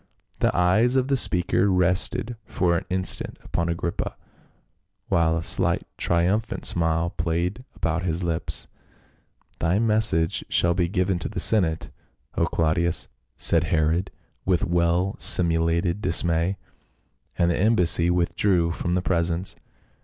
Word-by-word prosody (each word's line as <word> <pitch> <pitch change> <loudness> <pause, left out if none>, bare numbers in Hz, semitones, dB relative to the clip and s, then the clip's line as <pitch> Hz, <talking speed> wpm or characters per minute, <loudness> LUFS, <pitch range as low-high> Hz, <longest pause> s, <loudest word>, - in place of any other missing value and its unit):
The - - +3
eyes 110 +8 +3
of 130 0 +1
the 140 - +3
speaker 95 -3 +1
rested 90 +6 0
for 85 -2 +1
an 85 - -2
instant 95 0 -2
upon 85 0 -2
Agrippa, 85 0 -3 0.9
while 80 -1 +2
a 80 - -3
slight 85 0 -1
triumphant 95 +7 0
smile 80 0 +1
played 85 +8 -2
about 80 +1 -1
his 85 0 -2
lips. 85 -2 -2 0.5
" - - -38
Thy 85 +4 +1
message 105 -7 +1
shall 85 0 +2
be 90 -1 +1
given 90 -1 0
to - - -4
the - - -4
senate, 85 -8 +2 0.4
O - - +1
Claudius," 85 +1 0 0.3
said 85 0 +2
Herod 80 +3 +1 0.3
with 90 -2 +1
well 85 +2 +1
simulated 85 +2 +2
dismay, 85 +1 0 0.8
and 85 0 +3
the - - -1
embassy 90 -5 +3
withdrew 90 0 +1
from 85 +1 -2
the 90 0 0
presence. 85 0 -1
85 Hz, 130 wpm, -24 LUFS, 85-95 Hz, 0.9 s, The